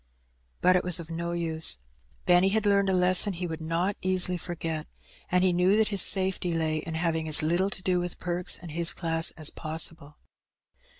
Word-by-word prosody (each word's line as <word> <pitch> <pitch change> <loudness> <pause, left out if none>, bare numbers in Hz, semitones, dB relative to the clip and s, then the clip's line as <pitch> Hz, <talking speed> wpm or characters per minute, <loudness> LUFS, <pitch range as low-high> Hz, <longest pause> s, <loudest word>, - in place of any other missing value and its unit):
But 185 - +4
it 180 - +1
was 180 -1 +4
of 165 0 -10
no 170 +1 -4
use. 160 - 0 0.5
Benny 180 +2 +3
had 215 +1 -1
learned 200 -1 +2
a - - 0
lesson 185 +2 +4
he 180 +1 -5
would 165 -1 -6
not 170 +5 -2
easily 185 -1 0
forget, 165 -2 -6 0.4
and 180 0 +2
he 185 -1 +2
knew 180 +4 +2
that 220 -1 +1
his 200 -2 +3
safety 185 -2 +3
lay 160 -1 -1
in 160 +1 -6
having 160 -1 -2
as 155 0 +4
little 175 +5 0
to 190 - -8
do 180 -1 0
with 175 0 -5
Perks 175 0 -1
and 170 -2 -11
his 170 +2 +3
class 165 -1 +1
as 155 -2 -2
possible. 155 -1 -2
175 Hz, 195 wpm, -26 LUFS, 165-185 Hz, 0.5 s, But